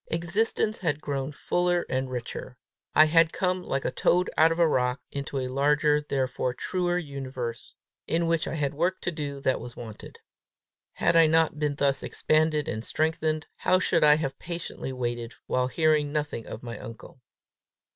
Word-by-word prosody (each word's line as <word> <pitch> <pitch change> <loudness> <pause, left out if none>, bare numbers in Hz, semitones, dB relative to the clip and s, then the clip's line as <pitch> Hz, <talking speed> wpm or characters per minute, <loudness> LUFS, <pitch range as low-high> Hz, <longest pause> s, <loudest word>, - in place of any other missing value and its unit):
Existence 205 +6 0
had 150 -5 0
grown 140 -2 -3
fuller 175 +3 0
and 130 0 -1
richer; 125 0 -6 0.4
I 155 - +8
had 165 +1 +4
come, 185 -1 0
like 135 -6 -3
a - - 0
toad 180 +7 +2
out 160 +1 +5
of 165 - -1
a 170 -1 +5
rock, 125 -3 +1
into 140 0 -4
a 130 -1 -1
larger, 145 +3 +2
therefore 130 -3 -1
truer 175 +4 -1
universe, 130 -7 -5 0.3
in 170 +1 +1
which 165 -1 +1
I - - -3
had 145 -3 -1
work 175 +5 0
to 175 - -1
do 145 -3 -5
that 130 - +1
was 120 - -9
wanted. 110 -3 -10 0.8
Had - - +1
I 165 -1 +7
not 160 -1 +2
been 150 -2 0
thus 140 -1 +1
expanded 155 -1 +1
and 110 0 -3
strengthened, 155 +1 -1
how 185 - +3
should 185 - +2
I 150 0 +7
have 145 -3 -3
patiently 170 -5 -5
waited 120 -2 -4
while 125 0 +1
hearing 150 +1 +2
nothing 150 -6 -3
of 115 - -8
my 120 -1 -6
uncle! 115 +3 -11
150 Hz, 175 wpm, -27 LUFS, 130-165 Hz, 0.8 s, I